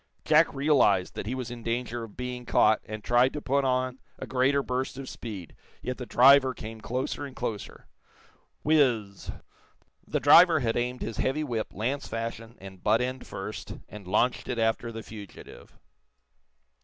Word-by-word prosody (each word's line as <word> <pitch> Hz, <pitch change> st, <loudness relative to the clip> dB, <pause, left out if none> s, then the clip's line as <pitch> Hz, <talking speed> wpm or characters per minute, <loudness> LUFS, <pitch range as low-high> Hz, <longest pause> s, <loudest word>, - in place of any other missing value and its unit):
Jack -, -, +5 dB
realized 135 Hz, -10 st, +3 dB
that -, -, -6 dB
he 125 Hz, -, -2 dB
was 125 Hz, -2 st, -5 dB
in 120 Hz, -1 st, -7 dB
danger 120 Hz, 0 st, -3 dB
of 110 Hz, -3 st, -11 dB
being 125 Hz, 0 st, -5 dB
caught, 110 Hz, -2 st, +3 dB
and 110 Hz, 0 st, -7 dB
tried 120 Hz, +2 st, +3 dB
to 150 Hz, -, -3 dB
put 140 Hz, 0 st, 0 dB
on 130 Hz, 0 st, 0 dB, 0.2 s
a -, -, -6 dB
greater 135 Hz, +2 st, +2 dB
burst 130 Hz, 0 st, -3 dB
of 135 Hz, -1 st, -7 dB
speed. 100 Hz, -8 st, -8 dB, 0.3 s
Yet 125 Hz, 0 st, -4 dB
the 125 Hz, -, -6 dB
driver 130 Hz, 0 st, +6 dB
came 110 Hz, 0 st, -8 dB
closer 130 Hz, +5 st, -3 dB
and 140 Hz, -2 st, -8 dB
closer. 110 Hz, -4 st, -5 dB, 0.8 s
Whizz 130 Hz, -10 st, +3 dB
zz! 100 Hz, -, -9 dB, 0.8 s
The -, -, -1 dB
driver 170 Hz, -3 st, +7 dB
had 115 Hz, -2 st, 0 dB
aimed 125 Hz, +1 st, -2 dB
his 115 Hz, -, -5 dB
heavy 145 Hz, +4 st, 0 dB
whip, 115 Hz, -6 st, -2 dB
lance 130 Hz, +7 st, -3 dB
fashion, 115 Hz, 0 st, -5 dB
and 95 Hz, -1 st, -12 dB
butt 110 Hz, +2 st, +3 dB
end 130 Hz, +1 st, -4 dB
first, 95 Hz, +2 st, -6 dB
and 105 Hz, -3 st, -11 dB
launched 120 Hz, +6 st, +1 dB
it 125 Hz, -, -2 dB
after 115 Hz, +1 st, 0 dB
the 115 Hz, -1 st, -7 dB
fugitive. 105 Hz, -3 st, -12 dB
120 Hz, 170 wpm, -27 LUFS, 110-130 Hz, 0.8 s, driver